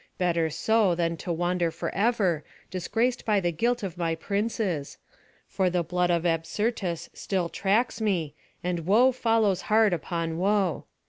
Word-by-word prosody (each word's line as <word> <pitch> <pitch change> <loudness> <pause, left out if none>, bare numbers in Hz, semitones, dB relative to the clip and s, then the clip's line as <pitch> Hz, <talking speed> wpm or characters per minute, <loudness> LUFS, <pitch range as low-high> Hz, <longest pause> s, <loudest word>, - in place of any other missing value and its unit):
Better 170 -3 +1
so, 210 +3 +2
than 170 -1 0
to 175 - -4
wander 175 0 0
forever, 185 -1 0 0.3
disgraced 225 +7 -1
by 210 -2 +2
the 175 -2 0
guilt 235 +8 0
of 180 -3 -5
my 165 -1 0
princes; 200 -4 -2 0.5
for 190 -1 +1
the 175 -1 0
blood 180 +2 0
of 170 0 +1
Absyrtus 175 +2 -1
still 185 -4 -2
tracks 220 +6 0
me, 175 -9 0 0.3
and 175 -2 -2
woe 240 +7 +5
follows 225 -6 +1
hard 215 -2 +4
upon 165 0 -3
woe. 195 -2 +1
180 Hz, 145 wpm, -27 LUFS, 170-215 Hz, 0.5 s, woe